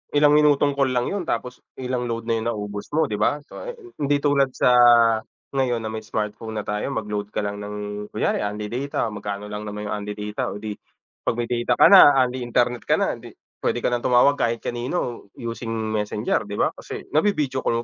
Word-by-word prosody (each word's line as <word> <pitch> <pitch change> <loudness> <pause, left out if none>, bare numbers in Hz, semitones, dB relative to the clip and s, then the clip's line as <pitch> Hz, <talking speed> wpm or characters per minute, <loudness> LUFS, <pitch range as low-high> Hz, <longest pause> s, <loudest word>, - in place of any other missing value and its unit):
Ilang 145 0 +5
minutong 145 -1 +4
call 135 -2 +2
lang 125 +7 0
yun 200 -3 -2
tapos 125 +2 -3 0.2
ilang 125 -1 -2
load 115 -1 -3
na 115 -1 0
yung 110 - -3
naubos 105 -2 -4
mo, 160 - +3
'di 105 - -2
ba? 125 +7 +2
So, - - -10
eh, - - -5 0.2
hindi 145 0 +2
tulad 140 -2 +3
sa 125 - +3 0.8
ngayon 130 -4 0
na 110 - -3
may 110 - -4
smartphone 110 +1 -4
na 105 - -2
tayo 105 +4 -2
mag-load 105 -3 -3
ka - - -1
lang 100 0 -3
ng 105 0 -6
kunyari 110 - 0
unli 105 +1 -4
data, 130 -2 -2
magkano 105 0 -5
lang 105 0 -5
naman 105 0 -5
yung - - -1
unli 105 0 -5
data. 105 0 -3
O - - -5
di 110 -1 -4 0.6
'pag - - +2
may 120 0 -3
data 120 0 +1
ka - - +6
na, 185 -8 +9
unli 125 +1 -3
internet 120 0 0
ka - - +4
na, - - 0
hindi - - -12 0.3
pwede - - -1
ka - - +1
ng 120 - +1
tumawag 125 +3 +4
kahit 115 -1 +1
kanino 120 -1 -3
using 115 0 -5 0.2
Messenger, 105 0 -1
'di 100 - -5
ba? - - +1
Kasi - - -8
navi-video 150 -6 +1
call 115 -1 0
115 Hz, 210 wpm, -23 LUFS, 105-130 Hz, 0.8 s, na